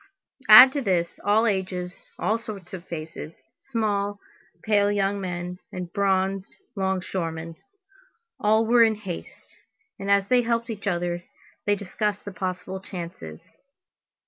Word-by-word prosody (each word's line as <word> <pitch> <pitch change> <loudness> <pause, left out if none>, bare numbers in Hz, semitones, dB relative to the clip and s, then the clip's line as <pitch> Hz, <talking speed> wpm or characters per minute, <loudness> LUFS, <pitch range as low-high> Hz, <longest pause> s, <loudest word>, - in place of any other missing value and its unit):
Add 250 +5 +12
to 285 - -1
this, 180 -7 0
all 210 +3 +3
ages, 185 -3 -1 0.2
all 220 +2 0
sorts 200 -6 -9
of 185 -1 -8
faces, 160 -1 -7 0.3
small, 205 -4 -1 0.4
pale 205 -2 +3
young 200 0 0
men, 180 -1 -4
and 180 -2 -6
bronzed 195 -1 0 0.2
longshoremen. 180 -4 -2 0.8
All 220 +2 +3
were 235 +1 +5
in 220 -1 +5
haste; 195 -5 -9 0.5
and 195 - -4
as 200 -1 +4
they 250 +2 +4
helped 235 0 -1
each 205 -2 -6
other, 175 -1 -1 0.4
they 205 - +4
discussed 205 +1 -3
the 200 - -5
possible 185 +1 -4
chances. 170 - -8
195 Hz, 130 wpm, -25 LUFS, 180-210 Hz, 0.8 s, Add